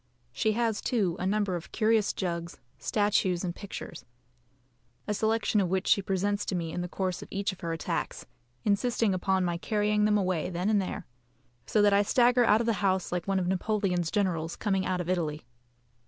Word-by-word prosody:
She 215 Hz, -, +1 dB
has, 225 Hz, -1 st, 0 dB
too, 200 Hz, -9 st, 0 dB
a 185 Hz, -, -1 dB
number 205 Hz, -2 st, +1 dB
of 170 Hz, -, -7 dB
curious 220 Hz, -2 st, +2 dB
jugs, 170 Hz, -2 st, -4 dB, 0.2 s
statues, 200 Hz, -4 st, +1 dB
and 175 Hz, -2 st, -2 dB
pictures, 200 Hz, +2 st, -8 dB, 1.0 s
a 210 Hz, -, 0 dB
selection 220 Hz, 0 st, +1 dB
of 185 Hz, -, 0 dB
which 190 Hz, 0 st, 0 dB
she 200 Hz, -, +4 dB
presents 200 Hz, +2 st, 0 dB
to 185 Hz, -, -2 dB
me 165 Hz, -2 st, -2 dB
in 175 Hz, -, -3 dB
the 175 Hz, -, -3 dB
course 185 Hz, 0 st, -3 dB
of -, -, -9 dB
each 200 Hz, 0 st, -1 dB
of 190 Hz, -, -14 dB
her 170 Hz, -, -3 dB
attacks, 165 Hz, -, -3 dB, 0.4 s
insisting 220 Hz, 0 st, +2 dB
upon 185 Hz, 0 st, +1 dB
my 175 Hz, -1 st, -1 dB
carrying 210 Hz, +2 st, +1 dB
them 210 Hz, 0 st, +3 dB
away 185 Hz, -5 st, 0 dB
then 180 Hz, +4 st, -1 dB
and 205 Hz, -2 st, +3 dB
there; 190 Hz, +1 st, -5 dB, 0.6 s
so 210 Hz, -, +3 dB
that 205 Hz, -1 st, +5 dB
I 200 Hz, -, +5 dB
stagger 245 Hz, +3 st, +4 dB
out 220 Hz, -1 st, +4 dB
of -, -, -1 dB
the 230 Hz, -, +2 dB
house 190 Hz, -2 st, +1 dB
like 175 Hz, 0 st, -2 dB
one 195 Hz, 0 st, +1 dB
of 180 Hz, -2 st, 0 dB
Napoleon's 185 Hz, -3 st, 0 dB
generals 170 Hz, -5 st, -1 dB
coming 195 Hz, -3 st, 0 dB
out 185 Hz, -1 st, 0 dB
of 175 Hz, -, -6 dB
Italy. 155 Hz, -6 st, -1 dB
195 Hz, 200 wpm, -29 LUFS, 180-210 Hz, 1.0 s, that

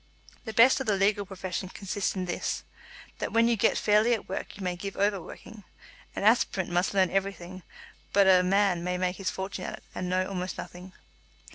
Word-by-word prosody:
The 220 Hz, -, -5 dB
best 245 Hz, +6 st, +6 dB
of 265 Hz, -, -4 dB
the 210 Hz, -, +3 dB
legal 200 Hz, +1 st, +1 dB
profession 185 Hz, -1 st, -5 dB
consists 195 Hz, +1 st, -3 dB
in 185 Hz, -1 st, -2 dB
this; 175 Hz, -, -3 dB, 0.6 s
that -, -, -3 dB
when 230 Hz, 0 st, +4 dB
you 235 Hz, -, +3 dB
get 205 Hz, -, +2 dB
fairly 215 Hz, +3 st, +3 dB
at 215 Hz, -, -9 dB
work 190 Hz, -, -5 dB
you 200 Hz, -, -7 dB
may 180 Hz, -1 st, -1 dB
give 195 Hz, +2 st, -7 dB
over 200 Hz, -1 st, +1 dB
working. 215 Hz, +5 st, -12 dB, 0.5 s
An -, -, -3 dB
aspirant 205 Hz, -4 st, +2 dB
must 175 Hz, +3 st, 0 dB
learn 190 Hz, -2 st, +3 dB
everything; 185 Hz, -2 st, -3 dB, 0.5 s
but 200 Hz, -1 st, +5 dB
a 185 Hz, -1 st, +7 dB
man 190 Hz, -1 st, +2 dB
may 180 Hz, 0 st, -1 dB
make 180 Hz, 0 st, -1 dB
his 195 Hz, -, -2 dB
fortune 190 Hz, -1 st, -5 dB
at -, -, -4 dB
it, -, -, -19 dB
and 180 Hz, -, -4 dB
know 185 Hz, +1 st, +1 dB
almost 185 Hz, -1 st, -4 dB
nothing. 180 Hz, +1 st, -9 dB
195 Hz, 205 wpm, -28 LUFS, 185-205 Hz, 0.6 s, a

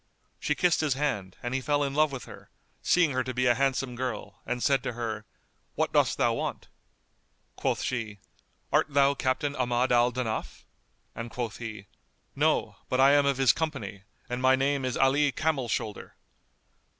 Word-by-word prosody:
She 150 Hz, -, 0 dB
kissed 175 Hz, 0 st, +2 dB
his 150 Hz, -4 st, +1 dB
hand; 105 Hz, -10 st, -2 dB
and 120 Hz, +1 st, -3 dB
he 135 Hz, -, 0 dB
fell 145 Hz, +2 st, +1 dB
in 140 Hz, -1 st, -2 dB
love 155 Hz, 0 st, +3 dB
with 135 Hz, -2 st, -6 dB
her, -, -, -13 dB, 0.3 s
seeing 175 Hz, -4 st, +3 dB
her 130 Hz, 0 st, 0 dB
to 130 Hz, 0 st, -5 dB
be 125 Hz, 0 st, +1 dB
a 120 Hz, -, +5 dB
handsome 135 Hz, 0 st, 0 dB
girl, 125 Hz, -1 st, -5 dB
and 125 Hz, -1 st, -2 dB
said 135 Hz, -2 st, +3 dB
to 120 Hz, -, -4 dB
her, 110 Hz, -2 st, -4 dB, 0.5 s
"What -, -, 0 dB
dost -, -, +3 dB
thou -, -, +2 dB
want?" -, -, -4 dB, 0.9 s
Quoth -, -, -1 dB
she, 115 Hz, -5 st, -3 dB, 0.6 s
"Art -, -, +4 dB
thou 140 Hz, 0 st, +4 dB
Captain 140 Hz, +2 st, -1 dB
Ahmad 125 Hz, 0 st, +1 dB
al 120 Hz, 0 st, +4 dB
Danaf?"; 120 Hz, -3 st, -4 dB, 0.5 s
and 115 Hz, +1 st, -6 dB
quoth 120 Hz, -2 st, -4 dB
he, 110 Hz, -4 st, -7 dB, 0.5 s
"No, -, -, +1 dB
but 130 Hz, -, 0 dB
I 135 Hz, +1 st, +7 dB
am 145 Hz, 0 st, +4 dB
of 140 Hz, -2 st, +1 dB
his 135 Hz, -2 st, +5 dB
company 140 Hz, -12 st, -4 dB, 0.3 s
and 125 Hz, 0 st, -3 dB
my 130 Hz, 0 st, +5 dB
name 135 Hz, 0 st, 0 dB
is 125 Hz, -, -2 dB
Ali 140 Hz, +2 st, +3 dB
Camel 145 Hz, -5 st, -1 dB
shoulder." 110 Hz, -3 st, -4 dB
130 Hz, 180 wpm, -28 LUFS, 120-140 Hz, 0.9 s, I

